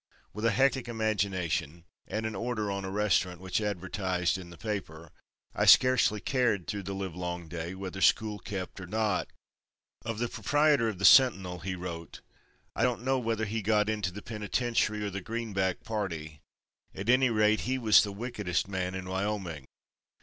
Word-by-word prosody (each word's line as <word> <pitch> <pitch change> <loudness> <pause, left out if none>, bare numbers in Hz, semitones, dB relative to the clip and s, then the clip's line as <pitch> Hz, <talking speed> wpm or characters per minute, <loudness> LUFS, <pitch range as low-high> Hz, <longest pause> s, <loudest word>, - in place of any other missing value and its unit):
With 105 +2 -4
a - - +5
hectic 130 +2 +2
imagination 100 -8 -1 0.2
and 110 +1 -3
an 110 - -2
order 110 -1 -2
on 100 0 -3
a - - -4
restaurant 95 -3 +1
which 95 +3 -2
advertised 95 -2 -1
in 95 -2 -7
the 85 - -12
paper 85 -7 -5 0.4
I - - +1
scarcely 125 -4 +6
cared 120 -6 0
through 105 -2 -3
the 100 +1 -5
livelong 90 -2 -4
day 85 +2 -5
whether 95 0 -6
school 105 0 +3
kept 95 0 -6
or 90 - -8
not." 105 -1 0 0.8
Of 115 -1 -4
the 120 +2 -1
proprietor 145 -3 +2
of 105 - -5
the 100 - 0
Sentinel 95 -7 +6
he 95 +2 -4
wrote: 85 -2 -7 0.5
"I - - -2
don't 120 -1 +1
know 130 0 +1
whether 115 -2 -1
he 110 +2 -2
got 105 +1 +2
into 105 -4 -1
the 105 +3 -9
penitentiary 110 0 -1
or 100 - -3
the 100 +1 -4
Greenback 100 -4 -2
party. 85 -8 -4 0.6
At 100 - -6
any 130 +1 +5
rate, 110 -1 +3
he 130 - +1
was 110 -4 +6
the 105 - -2
wickedest 105 -4 -2
man 95 -1 -3
in 95 -1 -5
Wyoming. 95 -7 -3
100 Hz, 170 wpm, -29 LUFS, 90-110 Hz, 0.8 s, scarcely